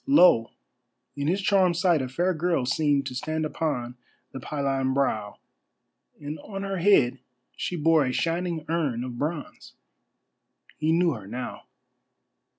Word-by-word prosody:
Lo! 180 - +6 0.7
in 140 0 -2
his 190 +4 0
charmed 185 -4 +3
sight 175 -4 +3
a 130 - -4
fair 175 +8 0
girl 165 -4 0
seemed 145 +1 +1
to - - -5
stand 155 +5 -2
upon 125 -6 -2 0.4
the 135 - -7
pylon 135 -2 -1
brow, 110 -7 -1 0.8
and 150 +1 -6
on 195 +4 -7
her 195 -1 -3
head 145 -9 +4 0.4
she 180 - -3
bore 160 -1 +4
a 130 - -1
shining 165 +1 -1
urn 150 -8 -1
of 125 -1 -6
bronze. 150 0 -5 1.1
He 155 +1 +1
knew 170 +1 +3
her 105 -8 -7
now. 120 +4 -6
155 Hz, 145 wpm, -26 LUFS, 130-175 Hz, 1.1 s, Lo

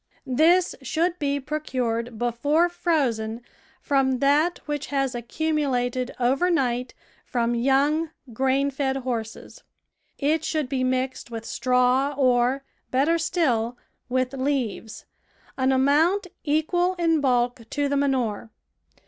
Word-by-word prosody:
This 330 +8 +3
should 335 +7 -1
be 285 -1 0
procured 250 -6 -3
before 285 +9 +1
frozen 245 -10 -1 0.4
from 270 -2 +2
that 295 +6 +2
which 295 -1 -3
has 275 -2 -1
accumulated 255 -1 -1
over 265 +8 +2
night 250 -7 0 0.3
from 235 -1 -1
young, 275 +6 +2 0.2
grain 270 +3 +1
fed 270 -1 -1
horses. 235 -4 -5 0.6
It 310 +2 +1
should 310 -3 -1
be 260 -1 -1
mixed 255 0 -1
with 225 -1 -6
straw 255 +3 +1
or, 255 0 +2 0.3
better 295 +6 +2
still, 245 -9 0 0.3
with 255 +1 0
leaves 260 -5 -3 0.3
— - - -34
an 260 0 +1
amount 300 +9 +3 0.2
equal 350 +4 +1
in 330 -3 +2
bulk 245 -2 +1
to 290 -1 0
the 285 - 0
manure. 255 -6 0
270 Hz, 120 wpm, -24 LUFS, 245-300 Hz, 0.6 s, This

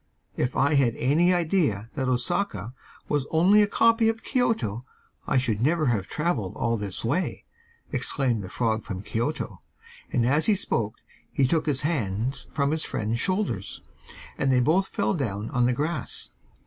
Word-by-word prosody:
'If 125 - -1
I 140 +3 +3
had 135 -5 +3
had - - -12
any 160 +8 +3
idea 160 - +1
that 130 -3 -1
Osaka 125 - -1 0.3
was 145 -2 0
only 185 +6 +5
a 205 - +4
copy 230 +2 +4
of 225 +1 -3
Kioto 215 - 0 0.5
I - - +2
should 115 -5 0
never 155 +4 +2
have 100 -4 -2
travelled 150 - -1
all 115 0 0
this 100 -1 -4
way,' 160 +11 -1 0.5
exclaimed 125 -3 0
the 95 - -7
frog 110 0 0
from 95 -2 -6
Kioto, 120 +9 -3 0.5
and 120 - +2
as 145 +5 +2
he 215 - +5
spoke 115 - -1 0.4
he 135 - +2
took 160 +3 +1
his 140 -3 0
hands 125 - -1
from 140 -1 +1
his 155 0 0
friend's 110 +2 -2
shoulders, 185 - -2 0.6
and 135 - +2
they 130 - +4
both 165 +10 +3
fell - - 0
down 110 - -3
on 125 -3 +2
the - - +2
grass. 150 +2 -3
135 Hz, 170 wpm, -26 LUFS, 115-165 Hz, 0.6 s, only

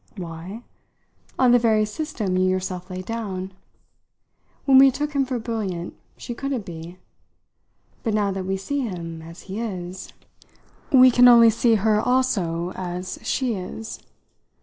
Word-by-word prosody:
"Why? 175 +5 -7 0.7
On 255 -2 +4
the 245 - +6
very 220 -2 +3
system 210 - -3
you 185 0 +2
yourself 185 0 -3
laid 185 0 -6
down. 195 -4 -4 1.1
When 265 -1 +7
we 270 0 +8
took 295 +3 -3
him 275 -1 +1
for 255 -1 -2
brilliant, 210 -7 -4 0.2
she 240 - -6
couldn't 265 -3 -3
be. 170 +1 -9 1.0
But 225 -3 -1
now 205 -2 +1
that 190 -1 -4
we 195 0 -1
see 285 +9 -3
him 170 -9 -5
as 165 +2 -11
he 195 +3 -6
is 185 -5 -6 0.4
" - - -32
"We 255 -1 +8
can 245 +1 +6
only 235 -2 +8
see 230 +1 +3
her 215 0 +2
also 185 -10 0
as 180 0 -5
she 245 +2 -1
is?" 180 - -6
205 Hz, 150 wpm, -23 LUFS, 185-240 Hz, 1.1 s, we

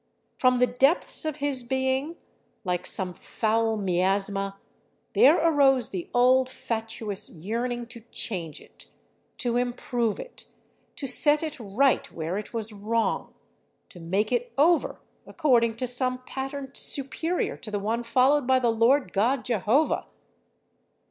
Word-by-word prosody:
From 255 -1 +3
the 250 - +4
depths 270 +8 +1
of 310 -2 -2
his 285 -3 -1
being, 265 +5 -1 0.5
like 180 -3 -2
some 185 -2 -2
foul 225 +3 -1
miasma, 195 +1 0 0.6
there 300 +6 +6
arose 275 -7 +3
the 180 -3 -5
old, 255 +1 +4
fatuous 225 -5 -4
yearning 235 +8 -4
to 235 0 -11
change 170 -8 -3
it, - - -15 0.5
to 240 -1 0
improve 245 -2 -1
it, - - -10 0.5
to 280 - -5
set 295 +4 +4
it 310 -3 -5
right 235 +5 +1
where 170 +4 -3
it 210 - -9
was 225 -2 -4
wrong, 220 +3 -2 0.5
to 180 - -13
make 195 +7 -1
it 245 -1 -1
over 325 +4 +3 0.3
according 240 -7 +2
to 255 - -3
some 255 +1 +1
pattern 270 +1 -6
superior 320 +6 -2
to 225 - -9
the 210 - -2
one 220 +4 -1
followed 255 +3 +2
by 260 0 +4
the 240 -2 +2
Lord 240 +5 +2
God 245 +6 +1
Jehovah. 240 - +1
245 Hz, 135 wpm, -26 LUFS, 215-265 Hz, 0.6 s, there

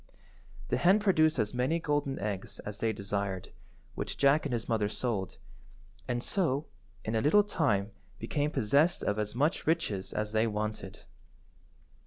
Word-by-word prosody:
The - - +1
hen 190 +4 +5
produced 160 -8 +3
as 110 -1 0
many 125 +6 +1
golden 145 -3 -1
eggs 100 -2 -4
as 105 0 -7
they 115 - +1
desired, 100 -2 -3 0.4
which - - -4
Jack 140 +2 +4
and 135 - -4
his 115 -1 -2
mother 110 -3 +1
sold, 110 -5 -3 0.7
and 120 0 -1
so 160 -7 0 0.4
in 110 - -1
a 110 - +2
little 205 - +5
time 110 - 0 0.3
became 145 +6 -1
possessed 145 +7 +2
of 105 +1 0
as 105 +1 -2
much 150 +7 0
riches 110 - 0
as 105 0 -2
they 110 +1 +2
wanted. 105 -2 -4
115 Hz, 155 wpm, -30 LUFS, 105-150 Hz, 0.7 s, hen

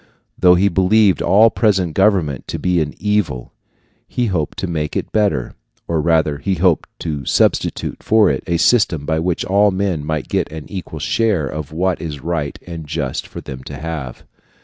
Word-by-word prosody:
Though 90 0 +5
he 95 +3 +3
believed 95 +2 +3
all 110 +3 +5
present 95 -7 +1
government 95 - +1
to - - -4
be 90 -2 +1
an 75 -1 -3
evil, 105 -12 -1 0.5
he 125 - -1
hoped 90 -9 -2
to - - -2
make 75 -3 -3
it - - -3
better, 105 - 0 0.3
or 80 -2 0
rather 80 -2 +1
he 95 +6 -1
hoped 85 -1 +1
to 75 -4 -3
substitute - - 0
for 110 -1 +4
it - - -3
a 85 -1 +1
system 90 -7 +2
by 80 +1 0
which 85 +1 -1
all 100 +2 +4
men 95 -5 -1
might 80 -1 -3
get - - -1
an 80 -1 -7
equal 95 -4 -6
share 105 -9 +1
of 75 +1 -6
what 90 +2 -1
it - - -5
is 75 -3 -5
right 75 -1 -3
and 85 -3 -7
just 75 -4 -3
for - - -8
them 65 -1 -8
to - - -7
have. 75 -6 -6
85 Hz, 190 wpm, -18 LUFS, 75-95 Hz, 0.5 s, Though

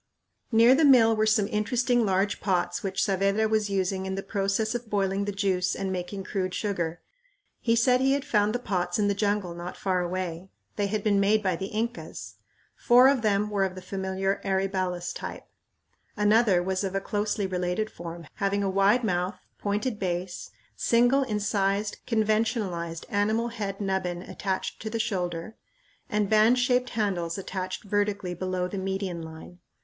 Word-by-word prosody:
Near 230 +2 +7
the 300 +4 +3
mill 240 -6 +6
were 215 0 +2
some 215 -2 +3
interesting 240 +3 +1
large 195 +1 +1
pots 180 +2 0
which 195 -2 -1
Saavedra 195 +2 +2
was 215 -1 +1
using 190 -1 -1
in 190 - -2
the 195 - -4
process 200 +2 0
of 240 -2 -5
boiling 195 -1 0
the 205 - -2
juice 190 -2 0
and 195 -1 -3
making 185 +2 -4
crude 185 -2 -2
sugar. 175 -5 -2 0.6
He 230 -1 +2
said 250 +2 +3
he 270 +1 +3
had 280 0 -1
found 210 +1 +2
the - - +3
pots 180 -7 -1
in 205 -1 +2
the - - +2
jungle 200 -3 -1
not 175 +1 -7
far 185 -2 0
away. 180 0 -4 0.3
They 205 -1 0
had 210 0 -2
been 205 -2 +3
made 210 +2 +3
by 185 -3 +1
the 190 +4 -4
Incas. 230 +4 -5 0.4
Four 250 +2 +6
of 275 -3 +2
them 210 -1 +1
were 200 -2 +1
of 190 -1 -2
the 185 - -8
familiar 190 0 -2
aryballus 190 -2 -1
type. - - -6 0.7
Another 210 -3 +4
was 190 +1 -1
of 195 0 -3
a - - +2
closely 205 +1 -1
related 180 +3 -2
form, 170 -1 -8
having 200 0 0
a 195 - 0
wide 200 +5 +3
mouth, 180 -1 -1 0.2
pointed 210 +3 -1
base, 180 -1 -3 0.3
single 245 +4 +3
incised, 205 -3 0
conventionalized, 215 -7 0
animal 220 +2 +1
head 205 -4 -4
nubbin 190 -3 -2
attached 190 -1 -4
to 220 - -4
the 230 - -2
shoulder, 185 -3 -3 0.5
and 210 -3 +1
band 220 +4 +5
shaped 250 0 +2
handles 180 -5 -1
attached 185 -1 -4
vertically 205 -2 -1
below 185 0 -2
the 195 +1 -5
median 190 -2 -3
line. 160 +2 -10
200 Hz, 170 wpm, -27 LUFS, 185-215 Hz, 0.7 s, Near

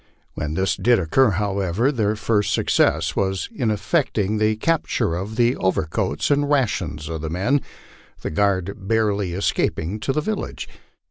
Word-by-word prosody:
When 75 0 -4
this 95 +2 0
did 120 -1 +4
occur, 110 +9 +3
however, 100 +4 0
their 110 -5 0
first 105 -1 0
success 80 +1 +2
was 95 -1 -1
in 120 - -1
effecting 110 - 0
the 110 0 +2
capture 150 - 0
of 95 +6 -4
the 120 +2 +3
over 95 -3 +1
coats 75 - -1
and 145 0 +2
rations 90 - 0
of 80 -2 -4
the 80 - -3
men, 100 - +1 0.6
the - - -4
guard 95 +2 0
barely 105 -4 +1
escaping 95 0 -1
to 135 - -1
the 150 - 0
village. 215 +7 -4
105 Hz, 155 wpm, -22 LUFS, 90-120 Hz, 0.6 s, did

